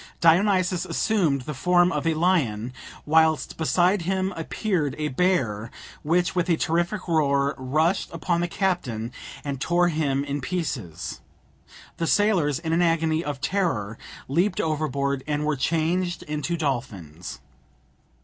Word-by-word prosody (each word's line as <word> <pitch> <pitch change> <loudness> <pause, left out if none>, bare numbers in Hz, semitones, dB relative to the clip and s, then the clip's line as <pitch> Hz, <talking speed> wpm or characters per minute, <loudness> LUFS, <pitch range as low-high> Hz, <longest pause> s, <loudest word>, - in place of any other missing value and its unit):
Dionysus 185 +1 +3
assumed 170 -11 +1
the 150 - -5
form 175 +6 +3
of 165 - -1
a 165 - +2
lion, 130 - +1 0.3
whilst 160 0 +3
beside 175 +4 +2
him 190 +2 -1
appeared 165 - -1
a 150 0 -1
bear, 125 - 0 0.3
which, 175 +3 +1
with 180 -1 0
a 165 - +3
terrific 175 +5 -1
roar, 140 -4 +2
rushed 155 +7 0
upon 170 -2 -1
the 175 - 0
captain 170 - -1 0.3
and 140 -2 -4
tore 175 +2 +3
him 145 -4 0
in 140 0 -3
pieces; 125 - -4 0.8
the 165 - -1
sailors, 190 -9 +3
in 165 -1 -2
an 170 - +3
agony 165 -1 +2
of 145 -4 -4
terror, 140 - -1 0.3
leaped 175 +9 +1
overboard, 140 -3 -1
and 150 0 -1
were 155 -1 +1
changed 170 +5 0
into 150 +3 -2
dolphins. 90 - -4
160 Hz, 135 wpm, -25 LUFS, 140-175 Hz, 0.8 s, Dionysus